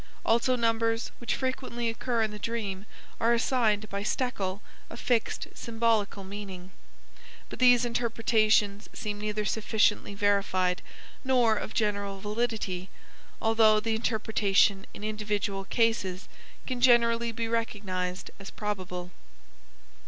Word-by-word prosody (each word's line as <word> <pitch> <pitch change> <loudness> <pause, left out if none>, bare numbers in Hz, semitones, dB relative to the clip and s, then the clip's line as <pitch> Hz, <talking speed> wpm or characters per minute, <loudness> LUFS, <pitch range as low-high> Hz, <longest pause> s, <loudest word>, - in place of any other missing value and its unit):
Also 235 +3 +3
numbers, 230 -1 0
which 240 - -1
frequently 260 -2 -2
occur 230 0 0
in 215 - -1
the 210 - -8
dream, 210 -3 -4 0.3
are 235 +1 +4
assigned 225 -3 +1
by 200 0 -2
Stekel 205 -4 -2 0.3
a 230 - -9
fixed 235 -2 0
symbolical 225 -4 0
meaning, 190 -2 -8 0.8
but - - -8
these 245 -1 +6
interpretations 220 -3 +1
seem 205 -1 -5
neither 210 0 -2
sufficiently 210 -1 +1
verified 195 -3 +1 0.4
nor 250 -4 +3
of 215 - -5
general 200 -2 -1
validity, 210 -4 -2 0.5
although 220 -1 +4
the 225 +1 -1
interpretation 215 -3 +2
in - - -10
individual 210 -2 -2
cases 215 -5 0 0.4
can 255 -2 -3
generally 235 -1 +4
be 230 0 -3
recognized 200 -5 -3
as 195 - -8
probable. 185 -4 -5
215 Hz, 115 wpm, -28 LUFS, 200-230 Hz, 0.8 s, these